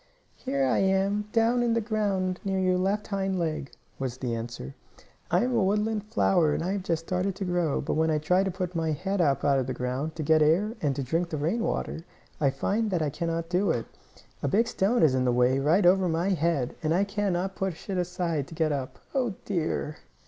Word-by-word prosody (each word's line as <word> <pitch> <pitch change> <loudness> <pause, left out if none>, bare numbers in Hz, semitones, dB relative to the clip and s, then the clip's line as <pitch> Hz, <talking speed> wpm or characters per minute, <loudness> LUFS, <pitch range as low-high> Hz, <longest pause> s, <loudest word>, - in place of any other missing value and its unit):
"Here 135 -1 -1
I 130 - +2
am, 195 +2 +1
down 235 +1 +3
in 235 -1 +2
the - - +3
ground 200 -5 -1
near 195 -1 -1
your 185 -1 +2
left 200 +3 0
hind 195 -2 -1
leg," 155 -5 -2 0.3
was 130 -2 -3
the 125 -3 -3
answer. 115 - -5 0.6
"I 180 +5 +3
am 250 +1 0
a 225 - +3
woodland 210 +2 0
flower 180 -8 +2
and - - -2
I 180 - -1
have 200 0 -1
just 165 -3 -2
started 185 +2 -1
to 195 0 -4
grow. 175 -4 0
But - - -2
when 160 +1 +2
I 155 - +2
tried 180 +5 +2
to - - 0
put 180 -1 -4
my 160 -1 0
head 190 +5 -1
up 140 -4 +1
out 140 -1 +4
of 130 - -2
the 130 - -3
ground, 130 +6 -3
to 155 - -3
get 155 +1 +4
air, 175 +9 +3
and 145 -3 0
drink 165 +6 0
the 155 - -3
rain 165 +11 0
water, 165 - -2 0.4
I 140 - +3
find 205 +11 -1
I 160 -5 0
cannot 165 +1 -2
do 180 +2 +1
it. 120 -8 0 0.6
A - - 0
big 225 - +2
stone 225 +1 +1
is 150 -5 +5
in 130 -1 +1
the 125 - +2
way, 125 +2 +3
right 165 +8 +3
over 185 0 +4
my 165 +4 0
head, 165 -8 0
and 160 +1 +1
I 190 - +3
cannot 195 -2 -1
push 190 -4 -4
it 190 -3 -1
aside 175 -5 -2
to 165 - -10
get 155 -1 +1
up. 135 -3 -3 0.2
Oh, 245 -7 0
dear!" 160 -5 -2
175 Hz, 225 wpm, -27 LUFS, 150-195 Hz, 0.6 s, is